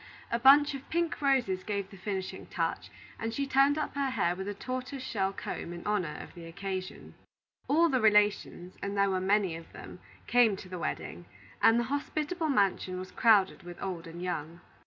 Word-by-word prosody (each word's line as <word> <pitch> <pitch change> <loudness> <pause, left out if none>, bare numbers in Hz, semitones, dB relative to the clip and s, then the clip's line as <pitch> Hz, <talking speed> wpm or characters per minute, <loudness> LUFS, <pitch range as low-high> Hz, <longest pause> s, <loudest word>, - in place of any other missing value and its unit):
A 235 - +1
bunch 285 +4 +7
of 275 0 -8
pink 340 -2 -1
roses 250 -10 +2
gave 200 -1 -3
the - - -11
finishing 190 0 -5
touch, - - -2 0.3
and 225 - -2
she 280 +5 -1
turned 275 +2 +4
up 305 - -2
her 280 -1 0
hair 195 -8 0
with 190 +1 -5
a 205 - -2
tortoise 255 +4 -5
shell 195 -6 -1
comb 185 - -6
in 170 - -9
honor 195 -7 -1
of - - -13
the 170 -2 -10
occasion. 190 +2 -6 0.5
All 330 +4 +4
the 260 -5 +1
relations 210 -4 +2
and 200 0 -3
there 200 0 +3
were 185 -1 0
many 195 -2 +2
of 165 0 -11
them - - -10 0.3
came 240 -4 +4
to 190 - -10
the 180 -1 -6
wedding, - - -4 0.4
and 225 +1 +6
the - - +1
hospitable 310 +3 -2
mansion 195 -6 +1
was 185 0 -7
crowded 210 -5 +4
with 175 0 -10
old 180 -3 -5
and 170 +2 -8
young. 170 -1 -4
205 Hz, 195 wpm, -30 LUFS, 185-260 Hz, 0.5 s, bunch